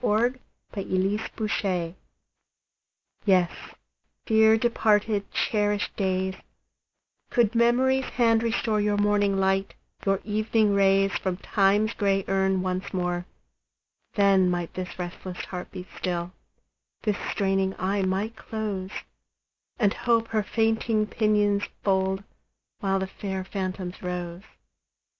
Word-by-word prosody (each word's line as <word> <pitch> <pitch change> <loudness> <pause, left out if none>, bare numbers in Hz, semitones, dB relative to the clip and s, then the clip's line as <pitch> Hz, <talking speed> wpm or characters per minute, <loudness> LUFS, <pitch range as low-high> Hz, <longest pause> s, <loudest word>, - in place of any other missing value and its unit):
DEPARTED 210 -3 -1
DAYS 185 -6 -1 1.3
YES, 185 -4 +4 0.7
dear 220 0 +5
departed, 215 -3 +1
cherished 205 -1 0
days, 190 -1 0 1.0
Could 235 -2 +2
Memory's 255 +3 +3
hand 230 -3 +2
restore 225 -2 0
Your 205 0 +1
morning 205 -1 +2
light, 195 0 +1 0.3
your 195 -1 +2
evening 215 0 +1
rays, 195 0 +3
From 185 -2 -2
Time's 205 +3 +2
gray 195 -2 +1
urn 190 -1 +1
once 185 +1 -2
more, 180 0 -1 0.9
Then 195 -2 +4
might 175 -1 -2
this 185 0 -6
restless 180 0 -6
heart 180 -1 -6
be 180 -1 -8
still, 175 -1 -2 0.7
This 210 -3 +1
straining 195 -1 0
eye 195 +2 0
might 195 +4 -1
close, 210 -4 -4 0.9
And 205 -4 +3
Hope 230 -1 +1
her 215 -1 +1
fainting 220 0 +1
pinions 210 -2 +2 0.2
fold, 190 0 +1 0.6
While 195 -3 +1
the 190 - -1
fair 190 0 -5
phantoms 185 -1 -4
rose. 180 -1 -4
200 Hz, 110 wpm, -26 LUFS, 190-215 Hz, 1.3 s, dear